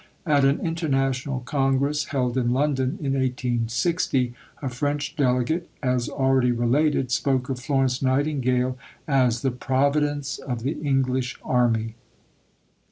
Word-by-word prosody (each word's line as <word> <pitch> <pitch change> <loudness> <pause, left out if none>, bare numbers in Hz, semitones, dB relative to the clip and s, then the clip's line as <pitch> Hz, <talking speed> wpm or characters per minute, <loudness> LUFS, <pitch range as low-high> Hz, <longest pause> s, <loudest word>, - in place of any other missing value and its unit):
At 145 -4 +3
an 140 +1 +3
International 135 -5 -1
Congress 140 +3 0
held 125 -4 -1
in 125 -2 +1
London 130 -1 0
in 135 -1 0
1860 125 +1 0 0.3
a 140 - -4
French 145 +4 -2
delegate, 140 +5 0
as 125 -2 0
already 130 -2 +2
related, 125 +3 +1
spoke 130 0 0
of 130 -2 -2
Florence 135 -1 0
Nightingale 130 -2 +1 0.3
as 125 -5 +2
"the 135 - +2
Providence 140 +3 0
of 120 -4 -5
the 135 - 0
English 130 -3 0
Army." 115 -3 +1
130 Hz, 120 wpm, -24 LUFS, 125-140 Hz, 0.3 s, At